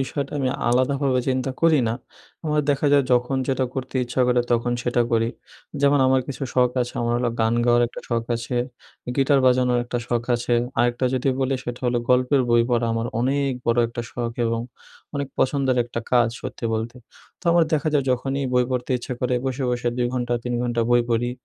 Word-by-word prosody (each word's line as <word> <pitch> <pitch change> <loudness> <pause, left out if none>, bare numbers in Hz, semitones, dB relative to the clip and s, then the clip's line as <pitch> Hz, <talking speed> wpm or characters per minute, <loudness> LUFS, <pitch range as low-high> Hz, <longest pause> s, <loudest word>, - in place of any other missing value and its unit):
বিষয়টা 140 +1 -3
আমি 130 -2 0 0.2
আলাদাভাবে 130 +1 +2
চিন্তা 130 0 0
করি 165 -3 +4
না। 115 - -1 0.5
আমার 150 0 +2
দেখা 145 +1 +1
যায় 140 -2 +5
যখন 125 +2 +2
যেটা 130 -1 +1
করতে 130 0 -5
ইচ্ছা 125 +1 -2
করে 125 0 +3
তখন 120 +1 +1
সেটা 120 0 +1
করি। 115 0 +2 0.5
যেমন 140 0 +4
আমার 130 0 +3
কিছু 140 +1 -6
শখ 125 -1 +4
আছে 120 - -7
আমার 120 0 0
হলো 120 -1 0
গান 110 +1 +2
গাওয়ার 120 0 +4
একটা - - -9
শখ 115 -1 0
আছে, 120 +1 -4 0.6
গিটার 135 0 +3
বাজানোর 125 -1 +3
একটা 120 0 -3
শখ 120 -1 0
আছে, 120 0 0 0.2
আরেকটা 120 +2 +1
যদি 130 +2 0
বলি 135 +1 +1
সেটা 120 0 -5
হল 120 - +1
গল্পের 125 +2 +3
বই 120 0 +5
পড়া। 120 -1 +2
আমার 115 +1 -1
অনেক 140 +2 +1 0.2
বড়ো 120 +1 +3
একটা 120 0 -5
শখ 120 -1 -3
এবং 115 0 -1 0.5
অনেক 140 -1 -2
পছন্দের 135 -1 +1
একটা 115 0 -5
কাজ 120 -1 +5
সত্যি - - -7
বলতে। 115 +3 -4 0.4
তো - - -19
আমার 170 -1 +5
দেখা 155 0 +1
যায় 140 -2 +2
যখনই 135 +2 -1
বই 125 0 +3
পড়তে 125 0 -2
ইচ্ছা 125 - -6
করে 125 0 0
বসে, 130 0 -2
বসে 120 0 -1
২ 120 -1 +1
ঘন্টা 120 -1 -1
৩ 120 0 -2
ঘণ্টা 120 -1 -1
বই 120 0 +5
পড়ি 120 +1 +1
125 Hz, 200 wpm, -23 LUFS, 120-135 Hz, 0.6 s, যায়